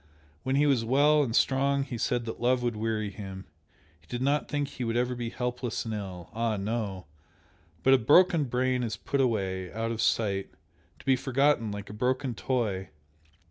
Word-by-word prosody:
when 130 +1 -1
he 145 +2 +4
was 135 -5 +3
well 145 +5 +4
and 120 -5 -1
strong 140 +1 +2
he 130 -3 -6
said 120 +1 -1
that 115 - -6
love 125 +1 +2
would 120 -2 0
weary 110 -1 -2
him 95 -1 -8 0.5
he - - -27
did 120 - -4
not 140 +3 +1
think 145 -1 -1
he 130 - -6
would 115 0 -1
ever 125 +1 +1
be 120 -1 -4
helpless 125 -1 -3
and 110 - -3
ill! 95 -4 -6
ah, 115 -1 0
no! 100 -2 -3 0.8
but 135 - +6
a 135 - +6
broken 160 +5 +5
brain 125 0 0
is 110 -2 -3
put 140 - -1
away 95 -7 -1
out 115 +2 -2
of 115 -1 -2
sight 100 -4 +1 0.5
to - - -17
be 135 - +4
forgotten 130 -3 +1
like 105 0 -6
a - - -8
broken 130 +3 0
toy! 105 -6 -2
120 Hz, 190 wpm, -28 LUFS, 110-130 Hz, 0.8 s, but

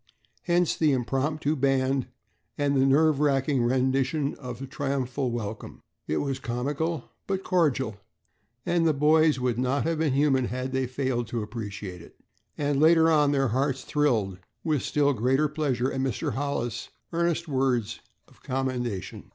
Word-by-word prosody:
Hence 175 -1 +2
the 155 -3 +3
impromptu 140 +4 0
band 135 -1 +1 0.5
and 145 -1 +1
the 135 0 +4
nerve 150 +1 +4
racking 140 -2 +2
rendition 130 +3 +1
of 125 -3 -6
the 135 - -6
triumphal 135 -1 -2
welcome. 110 -2 -6 0.2
It 80 - 0
was 135 -2 -2
comical 140 +5 -3 0.2
but 195 -1 -2
cordial, 135 - +1 0.7
and 170 -1 +2
the 155 - +2
boys 155 0 +4
would 125 -2 0
not 130 +2 +1
have 165 -1 -1
been 155 -4 +1
human 135 -2 +3
had 130 +2 -3
they 130 -1 0
failed 130 -2 -2
to 115 -2 -3
appreciate 105 -5 -6
it. - - -16 0.4
And 145 -1 0
later 160 +1 +5
on 150 -2 +4
their 135 -3 +2
hearts 130 +2 0
thrilled 110 -11 0 0.2
with 155 -5 +1
still 145 -1 +2
greater 130 +6 +2
pleasure 140 -4 -1
at 135 - -2
Mr. 130 -6 -1
Hollis' 120 -3 -3 0.2
earnest 170 0 0
words 130 -6 0 0.3
of - - -23
commendation. 125 -6 -3
135 Hz, 150 wpm, -27 LUFS, 125-150 Hz, 0.7 s, later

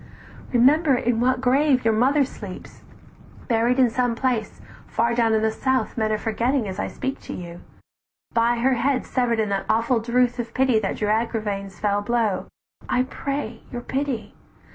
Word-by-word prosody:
Remember 275 +4 +4
in 240 -1 0
what 255 +1 +2
grave 265 0 +3
your 225 - +4
mother 270 +6 +3
sleeps, 205 -7 -10 0.7
"Buried 235 +1 +2
in 255 -3 +4
some 245 0 0
place 240 -3 -1 0.3
far 235 +1 0
down 230 -1 +2
in 220 - +1
the 220 - +2
south 260 +3 -1
Men 220 -2 0
are 215 - +1
forgetting 230 +3 0
as 190 +1 -5
I - - -1
speak 265 +1 -4
to - - -8
you; 175 -1 -8 0.7
By 235 +1 +3
her 260 +3 +2
head 255 +2 0
sever'd 240 -3 0
in 215 -2 0
that 195 -1 -2
awful 230 +2 +2
drouth 245 +2 +1
"Of 240 - -5
pity 255 -4 +3
that 195 -3 -2
drew 210 - -1
Agravaine's 210 -4 -2
fell 205 -1 +1
blow, 220 -2 0 0.4
I 250 - +2
pray 265 -3 -4
your 245 - -5
pity! 265 -4 -3
235 Hz, 175 wpm, -23 LUFS, 220-255 Hz, 0.7 s, Remember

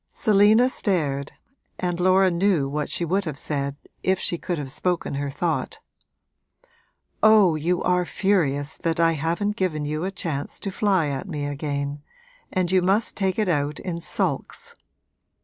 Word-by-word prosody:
Selina 215 +3 +4
stared 150 - -1 0.4
and 175 -1 -2
Laura 185 +1 +4
knew 170 -5 +2
what 145 +1 -3
she 170 - -1
would 190 +4 +1
have 155 -4 -4
said 140 -1 -2 0.3
if 190 0 +2
she 175 - -2
could 175 +1 -3
have 140 -3 -5
spoken 180 +2 -1
her 140 0 -2
thought. 160 +4 -2 1.4
'Oh, 215 -5 +6
you 170 +4 0
are 180 0 +2
furious 160 -7 0
that 165 -1 -1
I 165 0 +5
haven't 170 +7 -1
given 155 -7 -1
you 155 +2 -2
a 190 - -1
chance 160 -7 -4
to 195 - -3
fly 190 -6 +1
at 140 +7 -4
me 150 -4 -3
again, 145 0 -3 0.5
and 185 -1 0
you 185 -1 +4
must 195 +5 +1
take 190 -2 0
it 215 -2 +1
out 150 -3 0
in 170 -2 -4
sulks!' 470 - -2
170 Hz, 160 wpm, -24 LUFS, 145-190 Hz, 1.4 s, Oh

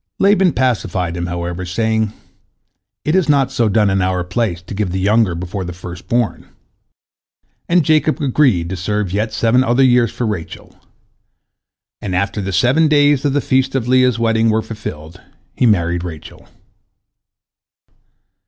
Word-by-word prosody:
" - - -62
Laban 195 -2 +4
pacified 100 -9 -1
him, 85 0 -3
however, 85 +1 -4
saying, 110 +3 -1 0.9
"It 150 - +1
is 185 -5 +2
not 140 -3 +2
so 115 -2 +1
done 105 -1 +2
in 95 0 +1
our 90 -1 0
place, 90 0 -2
to 90 - -9
give 100 -1 -2
the 95 +2 -3
younger 105 -1 +2
before 90 +3 -5
the 90 0 -6
first 90 0 -10
born," 120 -2 -1 1.2
and 170 -2 +3
Jacob 155 +1 +2
agreed 130 - +2
to - - -2
serve 95 +1 -2
yet 110 +2 -1
seven 120 +3 +2
other 130 +1 +2
years 125 -2 +3
for 120 - -3
Rachel, 105 -7 -6 1.3
and 95 -3 -3
after 100 +2 -1
the 95 0 -4
seven 130 - +3
days 145 -2 +3
of 140 - +1
the 145 - +1
feast 130 +1 0
of 125 -3 -1
Leah's 125 -2 +3
wedding 115 -1 +1
were 110 0 +1
fulfilled, 90 -6 -8 0.3
he 125 - +2
married 85 -4 +1
Rachel. 80 -4 -10
110 Hz, 160 wpm, -17 LUFS, 90-130 Hz, 1.3 s, Laban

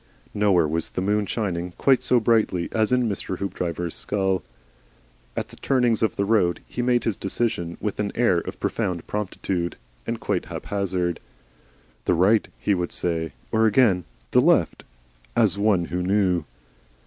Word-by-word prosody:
Nowhere 100 -6 +3
was 80 +2 -1
the - - -4
moon 105 +2 +1
shining 90 -5 -2
quite 135 -2 +4
so 125 - +3
brightly 110 -6 +2
as 110 0 +1
in 125 -1 +3
Mr. 95 -3 -3
Hoopdriver's 90 -3 -3
skull. 95 -2 0 1.0
At - - -2
the - - -14
turnings 125 -4 +2
of 110 -5 +1
the 100 - 0
road 100 -5 +2
he 120 - -4
made 120 0 +2
his 115 - 0
decisions 95 -4 -2
with 105 -2 -3
an 100 -1 -1
air 105 -8 +3
of - - -7
profound 85 -2 -2
promptitude 95 -4 -3 0.3
(and - - -2
quite - - -1
haphazard). 90 -4 -2 0.9
"The - - +3
Right," 100 +6 +4
he 105 - +1
would 90 -2 -1
say. 80 -2 -1 0.2
Or 110 0 +4
again 100 -5 +3 0.3
"The - - +5
Left," - - +2 0.5
as 100 - +3
one 100 -4 +3
who 90 +2 -3
knew. 90 -3 +1
100 Hz, 160 wpm, -24 LUFS, 90-110 Hz, 1.0 s, The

